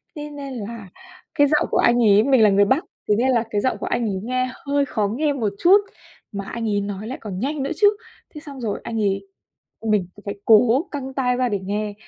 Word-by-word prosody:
thế 295 0 -6
nên 280 -2 -7
là 215 -3 -7 0.5
cái 290 -1 +5
giọng 300 +1 +2
của - - +1
anh 240 0 +4
ấy 210 0 +5
mình 265 -4 +4
là 210 - +6
người 200 +1 +4
Bắc, 265 +10 +2 0.3
thế 210 - +4
nên 260 +3 +2
là 235 -3 +2
cái 205 -2 -1
giọng 260 - 0
của - - -5
anh 240 0 -1
ấy 190 -1 -3
nghe 255 +1 -1 0.2
hơi 285 0 +1
khó 210 -5 -1
nghe 290 +7 0
một 220 -7 -2
chút. 370 +4 +7 0.5
Mà 200 -1 -5
anh 230 0 -4
ấy 205 -1 0
nói 200 +1 -5
lại 260 - -5
còn 195 -4 -6
nhanh 275 +4 -2
nữa 275 - -3
chứ, 410 +5 +5 0.5
thế 300 - -8
xong 280 -4 -10
rồi 220 -4 -2
anh 225 -1 -4
ấy 195 -1 -1 0.6
mình 210 -4 +2 0.2
phải 200 - -4
cố 240 - +4
căng 265 -2 -6
tai 250 -2 0
ra 250 0 +1
để 205 - -1
nghe, 205 +2 -3
235 Hz, 240 wpm, -22 LUFS, 205-275 Hz, 0.6 s, chút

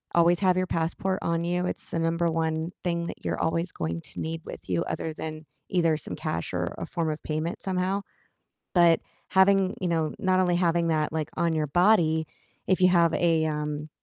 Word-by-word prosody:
always 170 0 +5
have 185 -2 +3
your 185 - +2
passport 175 +4 -1
on 170 0 0
you, 175 +1 0
it's - - -5
the 165 - -1
number 165 +1 +1
1 160 0 -1
thing 170 -1 -1
that - - -8
you're - - -1
always 165 +2 0
going 85 +1 -3
to - - -11
need 160 0 -3
with - - -8
you 90 -2 +1
other 160 - -3
than 155 0 -6 0.2
either 165 -3 +2
some 150 - -6
cash, 85 0 -3
or - - 0
a - - -3
form 165 -2 -1
of 155 - -5
payment 155 +3 -3
somehow, 190 +1 -1 0.7
but 170 -2 +5 0.3
having 190 0 +4
you 185 - -1
know, 160 -2 +1
not 185 0 +2
only 180 -1 +2
having 170 -1 +2
that, 155 -2 +1
like, 155 -2 -2
on 170 -1 +1
your 155 -1 0
body, 160 -1 +3 0.4
if 185 0 +2
you 185 - +6
have 170 -2 +4
a, 165 -2 +2
um 150 0 -3
165 Hz, 200 wpm, -27 LUFS, 160-180 Hz, 0.7 s, you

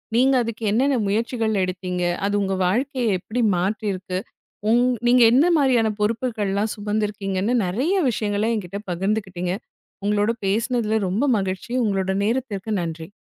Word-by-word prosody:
நீங்க 260 +3 +4
அதுக்கு 230 0 -6
என்னென்ன 265 +5 +2
முயற்சிகள் 225 +1 0
எடுத்தீங்க, 180 0 -3 0.2
அது 205 - 0
உங்க 195 -1 0
வாழ்க்கையை 255 +5 0
எப்டி 230 +7 -3 0.2
மாற்றியிருக்கு, 190 -1 -2 0.5
உங் 240 +2 +4 0.2
நீங்க 245 +1 +5
எந்த 275 +8 +5
மாரியான 255 -6 +3
பொறுப்புகள்லாம் 215 -2 -1
சுமந்திருக்கீங்கன்னு 210 0 -1
நெறைய 255 - 0
விஷயங்கள 210 -2 -1
என்கிட்ட 195 -2 -5
பகிர்ந்துக்கிட்டீங்க. 190 -1 -2 0.5
உங்களோட 205 +1 +2
பேசனதுல 220 +2 0
ரொம்ப 210 +10 +1
மகிழ்ச்சி. 190 +4 -4
உங்களோட 190 -2 0
நேரத்திற்கு 220 -3 -2
நன்றி. 165 0 -6
210 Hz, 120 wpm, -22 LUFS, 195-235 Hz, 0.5 s, நீங்க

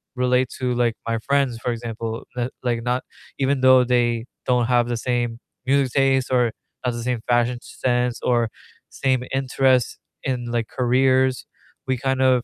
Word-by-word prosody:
relate 125 0 +2
to, 125 -1 0
like, 120 -1 +2
my 115 0 0
friends, 135 -1 +1
for 120 +1 -2
example, 115 -1 -5
like 125 0 -1
like 120 -2 -1
not 125 +1 0 0.4
even 135 0 +1
though 130 -1 +7
they 120 -2 +1 0.2
don't 125 -1 +2
have 120 -1 +3
the 120 -1 -1
same 120 -1 -1 0.3
music 135 -1 +2
taste, 135 -1 +2
or 125 -2 +3 0.3
has 125 -1 0
the 120 - -5
same 125 -2 -1
fashion 120 0 +2
sense 125 -1 -1
or 120 -2 +2 0.4
same 130 -2 0
interests 130 -2 +2 0.3
in, 125 -2 -2
like, 115 -1 -1
careers, 130 +1 +2 0.4
we 130 -1 +1
kind 135 +1 -1
of 130 -2 +4
125 Hz, 165 wpm, -22 LUFS, 120-130 Hz, 0.4 s, though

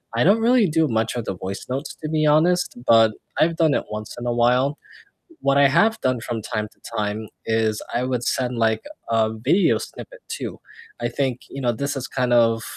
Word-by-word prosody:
I 120 - +3
don't 200 +6 +5
really 230 -1 +4
do 160 0 +2
much 110 -1 -1
of 120 -2 -3
the 95 - -3
voice 95 +2 -6
notes, 135 +4 -3
to 155 - -4
be 155 -1 +1
honest, 165 +4 +3
but 115 -1 +6 0.3
I've 165 +1 +3
done 160 -3 +3
it - - 0
once 105 0 -6
in 120 - -6
a 120 - 0
while. 125 +5 +2 0.6
What 140 0 +2
I 140 0 +6
have 220 +10 +3
done 130 -2 +1
from 115 -1 -4
time 105 0 -3
to - - -29 0.2
time 105 +1 -2 0.2
is 110 -1 0
I 120 - 0
would 125 -2 -1
send, 125 0 -1
like, 110 -1 +1 0.3
a 110 -1 +2
video 135 - +2
snippet - - -9
too. - - -5 0.4
I - - -1
think, 130 -3 -2
you 135 - -7
know, 120 -2 +2
this 140 +5 -3
is 130 -1 -4
kind 125 -1 0
of 115 -1 +3
125 Hz, 210 wpm, -22 LUFS, 115-150 Hz, 0.6 s, but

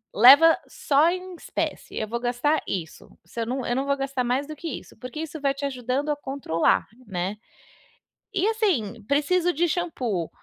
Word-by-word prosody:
leva 285 +9 +8
só 295 +3 +3
em 365 0 -6
espécie, - - -4
eu 215 - -2
vou 235 +2 -3
gastar 250 +6 +1
isso, 165 -5 -5
se 175 +7 -9
eu 230 - -1
não 255 +2 -2
eu 240 - 0
não 270 +2 0
vou 280 0 +1
gastar 270 -2 -2
mais 260 +4 0
do 310 - -7
que 335 - -7
isso - - -18
porque 255 +4 -7
isso 315 0 -5
vai 275 -1 +1
te 275 +1 -8
ajudando 260 +2 -2
a 295 - +2
controlar, 270 - 0 0.2
né. 190 +2 -3 1.0
E, 385 +1 +2
assim, 330 - 0
"Preciso 345 +5 +2
de 340 +3 +1
xampu", 255 - -2
275 Hz, 185 wpm, -25 LUFS, 240-315 Hz, 1.0 s, leva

